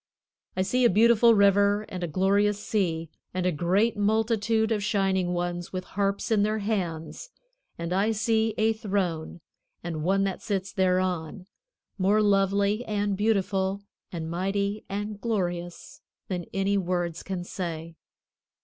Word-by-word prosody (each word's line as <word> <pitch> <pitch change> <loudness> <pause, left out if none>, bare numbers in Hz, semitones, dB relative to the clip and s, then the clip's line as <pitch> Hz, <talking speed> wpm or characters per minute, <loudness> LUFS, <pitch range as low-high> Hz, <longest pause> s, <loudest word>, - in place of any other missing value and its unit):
I 185 - +2
see 250 +7 +1
a 240 - +6
beautiful 230 +2 +5
River 200 +1 +4
and 180 -1 -6
a - - -1
glorious 200 +4 +2
Sea, 170 -7 -1 0.3
and 185 -1 -1
a 180 - +3
great 185 +8 +1
multitude 220 +1 +1
of 215 -2 +1
shining 195 -3 +1
ones 175 0 -3
with 185 -1 -4
harps 200 +4 -2
in 215 -2 +4
their 215 +1 +1
hands, 195 - -3 0.5
and 170 +1 -3
I 200 +4 +2
see 220 0 +1
a 220 +1 +3
throne 190 -7 -2 0.4
and 165 -3 -4
One 195 +3 +2
that 195 -1 -2
sits 195 -4 -3
thereon, 185 -2 0 0.5
more 200 +3 +3
lovely 200 +2 +2
and 205 -1 -1
beautiful 195 -1 0 0.3
and 165 -2 -4
mighty 200 +4 -2
and 205 +1 -4
glorious 175 -6 -3 0.3
than 180 -3 -3
any 195 +1 +1
words 175 -2 -2
can 185 -2 -4
say. 165 -2 -5
195 Hz, 140 wpm, -27 LUFS, 180-210 Hz, 0.5 s, a